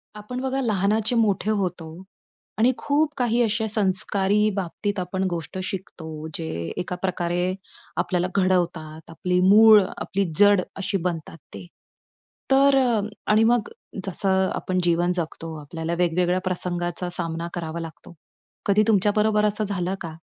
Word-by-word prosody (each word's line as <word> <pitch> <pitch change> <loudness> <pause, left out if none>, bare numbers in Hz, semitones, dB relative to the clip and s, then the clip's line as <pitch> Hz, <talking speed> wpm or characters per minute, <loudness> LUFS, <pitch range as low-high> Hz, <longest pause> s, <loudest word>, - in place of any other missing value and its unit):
आपण 210 +4 -6
बघा 265 +1 -1
लहानाचे 215 0 +1
मोठे 215 -3 +1
होतो 180 -5 -3 0.6
आणि 235 +4 +4
खूप 300 +1 0
काही 240 -1 +1
अशा 220 0 0
संस्कारी 205 0 +2
बाबतीत 200 +2 -3
आपण 185 +1 -2
गोष्ट 170 +1 -5
शिकतो, 160 -5 -6
जे 165 - -4 0.3
एका 180 0 -3
प्रकारे 180 -1 -1 0.4
आपल्याला 180 -1 0
घडवतात, 175 -5 -1
आपली 180 +2 -1
मूळ, 210 +3 +8 0.2
आपली 200 +1 -1 0.2
जड, 205 -2 +6
अशी 195 0 -2
बनतात 165 -2 -3 0.2
ते. 100 -2 -8 0.9
तर 275 +1 +5
अ, 240 -5 +2 0.3
आणि 215 +1 +5
मग 235 0 +2 0.4
जसं 190 0 +1
आपण 185 0 -2
जीवन 175 +1 +2
जगतो, 165 -1 -4
आपल्याला 160 +3 -5
वेगवेगळ्या 180 +1 +1
प्रसंगाचा 175 -1 -2
सामना 165 0 -3
करावा 165 -1 -4
लागतो. 165 +1 -9 0.5
कधी 205 +1 +4
तुमच्या 205 -2 +3
बरोबर 210 0 +3
असं 210 +1 +1
झालं 190 -2 -2
का 165 -2 -6
190 Hz, 135 wpm, -24 LUFS, 175-210 Hz, 0.9 s, मूळ